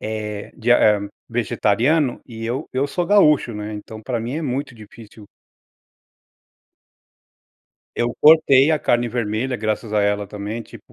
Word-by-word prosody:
eh, 105 -1 -5
de 120 +2 +2
ham, 105 -3 +3 0.2
vegetariano 120 +5 0
e 115 -2 -8
eu, 125 +6 -3
eu 130 +2 0
sou 175 +4 -2
gaúcho, 150 - +4
né, 105 +1 -6
então, 110 +1 -9
para 120 +1 -3
mim 120 +3 -5
é 165 - -3
muito 135 -1 -3
difícil. 110 0 -14 2.7
Eu 120 0 -1
cortei 150 -2 +6
a 155 - +2
carne 120 -3 +1
vermelha, 120 +2 -2
graças 110 0 -3
a 105 - +2
ela 100 0 0
também 105 +3 -6
tipo, - - -16
115 Hz, 145 wpm, -21 LUFS, 105-130 Hz, 2.7 s, cortei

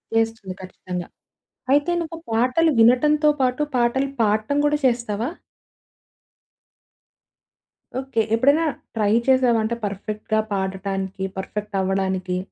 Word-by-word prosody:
చేస్తుంది 225 -4 0
ఖచ్చితంగా. 180 -1 -6 0.7
అయితే, 290 +4 +3
నువ్వు 330 0 -6
పాటలు 255 +8 +3
వినటంతో 295 +6 +5
పాటు, 255 +2 +1 0.2
పాటలు 245 +3 +1
పాడటం 215 +5 +1
గూడా 295 0 +2
చేస్తావా? 235 -2 0 2.7
ఓకే. 265 -4 -1
ఎప్పుడైనా 280 +7 +3 0.3
ట్రై 210 -2 +1 0.2
చేశావా? 260 -3 +4
అంటే 225 +2 -1
పర్ఫెక్ట్‌గా 215 +2 -2
పాడటానికి, 190 0 -3
పర్ఫెక్ట్ 210 +2 -5
అవ్వడానికి 190 -1 -1
225 Hz, 95 wpm, -22 LUFS, 195-260 Hz, 2.7 s, వినటంతో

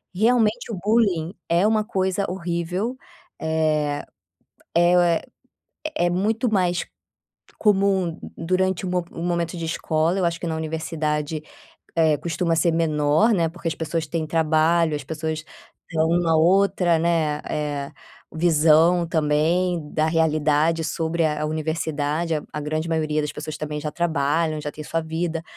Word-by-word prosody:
Realmente 225 +2 +2
o 210 - -4
bullying 200 -6 +2 0.2
é 170 +3 +3
uma 215 -1 +2
coisa 190 -2 0
horrível. 180 +6 -3 0.4
Eh, 155 -2 0 0.7
é 175 +1 +5
o - - +6 1.0
é 175 - +2
muito 215 +6 0
mais 180 -3 +1 0.7
comum 195 -5 +2 0.2
durante 185 +2 0
o - - -2
mo 180 -1 0
o 165 - -6
momento 170 0 -1
de 165 - -4
escola, 160 +2 0
eu 185 - +1
acho 170 0 -2
que - - -4
na 160 -1 -2
universidade, 155 -1 -2 0.5
eh, 160 -2 +4
costuma 165 +1 -1
ser 170 +2 +3
menor, 155 +5 +2
né. 170 -4 +2
Porque 170 0 -5
as 160 - -2
pessoas 160 0 -2
têm 160 0 -2
trabalho, 160 +1 +2
as 145 - -7
pessoas 160 +1 -4 0.5
tão 160 -1 +1
uma 170 -1 +2
outra, 180 0 +3
né, 160 -3 +1
eh, 145 -1 -3 0.4
visão 165 +1 +4
também 165 +3 +1
da 155 0 +2
realidade 160 0 +2
sobre 165 +1 -1
a 150 -1 0
a - - 0
universidade, 155 0 -1
a 150 - -4
a 150 - -4
grande 155 +2 -2
maioria 155 -2 0
das 150 - -3
pessoas 150 0 -6
também 150 -1 -4
já 150 - -3
trabalham, 155 -1 0
já 150 - -4
tem 155 - -8
sua 165 +2 -1
vida. 165 +1 -3
165 Hz, 150 wpm, -23 LUFS, 155-175 Hz, 1.0 s, o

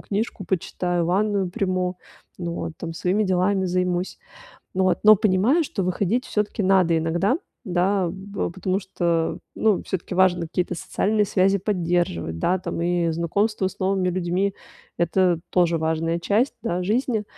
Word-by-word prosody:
книжку 205 -1 -3
почитаю, 175 -1 -1
ванную 195 0 +1
приму. 185 -3 -1 0.4
Ну 170 -2 -4
вот, 165 - -4
там 165 -1 -6
своими 185 +5 0
делами 190 0 +1
займусь. 180 0 -1 0.6
Ну 190 0 +2
вот, 185 - +2
но 215 0 +9
понимаю, 215 - +3
что 195 - -3
выходить 200 +7 0
всё-таки 210 0 -1
надо 185 -3 +3
иногда, 175 - +1 0.3
да 185 0 +1
б 195 +2 -4
потому 190 +2 -1
что, 170 -4 -1 0.2
ну, 215 -4 +2
всё-таки, 185 -1 -4
важно 185 -2 +4
какие-то 180 +2 -2
социальные 210 +5 0
связи 195 0 +2
поддерживать, 175 - -1
да, 185 +2 +2
там, 170 -1 -4
и 175 -1 +1
знакомство 190 +4 0
с - - -14
новыми 190 -1 +1
людьми- 185 +2 0 0.5
это 175 0 +2
тоже 170 -2 +2
важная 160 +1 0
часть, 210 +10 +1
да, 180 -5 -1
жизни. 220 +2 0
185 Hz, 150 wpm, -23 LUFS, 175-200 Hz, 0.6 s, но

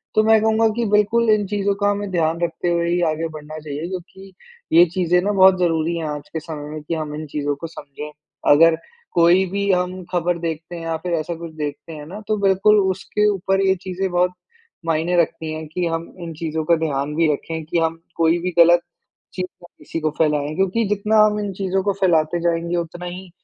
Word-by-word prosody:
तो 215 - +5
मैं 220 0 +5
कहूँगा 220 +1 +3
कि 235 - +1
बिल्कुल 220 +2 +3
इन 210 -2 +2
चीज़ों 200 0 0
का 205 - +3
हमें 205 0 -3
ध्यान 165 -1 0
रखते 170 +1 -1
हुए 170 0 +1
ही 175 0 +1
आगे 165 +1 -2
बढ़ना 155 +1 -9
चाहिए 150 +2 -5
क्योंकि 190 +1 -9 0.4
ये 175 - +9
चीज़ें 180 -1 +2
ना 205 +3 0
बहुत 190 -1 +6
ज़रूरी 165 -1 +1
हैं 160 - -3
आज 150 -1 -6
के 160 - -2
समय 150 -2 -7
में 155 0 -6
कि 165 - -4
हम 155 -2 -4
इन 155 - -5
चीज़ों 145 0 -2
को 165 +3 -7
समझें। 150 -1 -9 0.4
अगर 160 +2 +6 0.4
कोई 175 +3 +5
भी 200 0 0
हम 180 0 -1
ख़बर 175 0 0
देखते 165 0 -5
हैं 170 - -7
या 165 0 -2
फिर 180 - -2
ऐसा 155 +2 -4
कुछ 170 0 -8
देखते 150 +2 -5
हैं 150 -1 -8
ना 195 +6 -8
तो 215 - +1
बिल्कुल 200 +2 +4
उसके 195 +2 0
ऊपर 195 0 0
ये 190 - +4
चीज़ें 190 0 -3
बहुत 180 +1 +2 0.5
मायने 165 +2 0
रखती 160 -1 -3
हैं 155 0 -6
कि 175 +3 -2
हम 165 0 -2 0.2
इन 165 -1 -6
चीज़ों 160 0 -3
का 170 - +4
ध्यान 150 -2 -2
भी 165 -2 +3
रखें 160 +3 -5
कि 165 +1 0
हम 165 0 -1 0.2
कोई 165 +1 +3
भी 180 +1 -2
ग़लत 170 +1 +7 0.5
चीज़ 185 -1 -2 0.2
ना - - -12
किसी 165 - -6
को 155 -1 0
फैलाएँ। 150 -1 +1
क्योंकि 195 +4 +1
जितना 210 +2 +1
हम 210 0 0
इन 205 -1 -3
चीज़ों 190 0 -1
को 200 - +2
फैलाते 170 -2 +2
जाएँगे 170 0 0
उतना 175 +1 -4
ही 180 +1 -8
170 Hz, 220 wpm, -21 LUFS, 160-190 Hz, 0.5 s, ये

